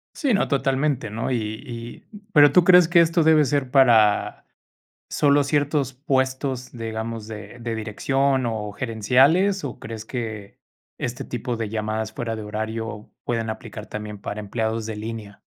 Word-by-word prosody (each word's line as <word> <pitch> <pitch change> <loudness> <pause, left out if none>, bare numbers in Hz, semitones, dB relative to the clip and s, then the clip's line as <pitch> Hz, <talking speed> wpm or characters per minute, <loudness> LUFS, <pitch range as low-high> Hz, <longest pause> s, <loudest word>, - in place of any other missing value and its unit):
Sí, 275 -8 +1
no. 200 - +2
Totalmente, 135 -2 0
¿no? 115 +4 -3
Y 125 - +1 0.2
y, 120 -1 -9 0.3
pero 145 -2 +7
¿tú 180 +3 +6
crees 180 -1 +7
que 175 +1 +5
esto 165 0 +3
debe 155 -1 +5
ser 135 -1 0
para 115 -6 +4 0.6
solo 145 0 +3
ciertos 145 -1 0
puestos, 130 -1 -1
digamos, 115 -1 -5
de 105 +1 -9
de 115 -1 -3
dirección 135 +5 0
o 105 -2 -3
gerenciales? 135 - +2
¿O 140 - -6
crees 110 -1 -7
que 110 -4 -6 0.4
este 125 +1 -4
tipo 120 0 -4
de 110 -2 -3
llamadas 110 0 -3
fuera 115 -1 -3
de 110 - -6
horario 110 +1 -5
pueden 115 -2 -2
aplicar 110 -1 -7
también 105 -1 -6
para 105 +1 -5
empleados 110 +1 -2
de 110 -1 -5
línea? 110 -1 -7
120 Hz, 155 wpm, -23 LUFS, 110-140 Hz, 0.6 s, pero